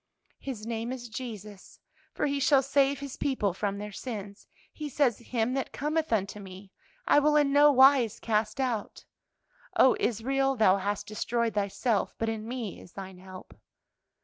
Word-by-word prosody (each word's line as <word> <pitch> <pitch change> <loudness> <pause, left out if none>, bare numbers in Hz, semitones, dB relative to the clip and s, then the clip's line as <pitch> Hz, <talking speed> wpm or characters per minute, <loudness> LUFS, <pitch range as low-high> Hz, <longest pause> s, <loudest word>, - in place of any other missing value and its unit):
"'His 240 -6 -6
name 230 +1 -3
is 245 -2 -6
Jesus, 215 -4 -8 0.3
for - - -2
He 280 -1 0
shall 275 0 +4
save 275 0 +2
His 280 -2 -7
people 210 -9 0
from 200 +1 -2
their 210 +1 -6
sins.' 205 -2 -7 0.3
He 300 -1 -6
says, 260 -5 +1
'Him 235 0 -1
that 270 -1 -2
cometh 310 +1 -2
unto 205 -2 -1
me, 190 0 -11 0.3
I - - +5
will 300 +1 +3
in 290 -2 +3
no 290 +1 +7
wise 265 -4 +5
cast 215 +1 -1
out.' 240 -6 -3 0.7
'O 260 - +6
Israel, 270 +4 0
thou 205 -5 +4
hast 205 +1 -2
destroyed 225 +2 -1
thyself; 205 +2 -1
but 225 - -1
in 220 -1 -4
me 235 -5 -5
is 175 - -16
thine 190 -2 -9
help.' 185 0 -12
230 Hz, 165 wpm, -28 LUFS, 205-270 Hz, 0.7 s, no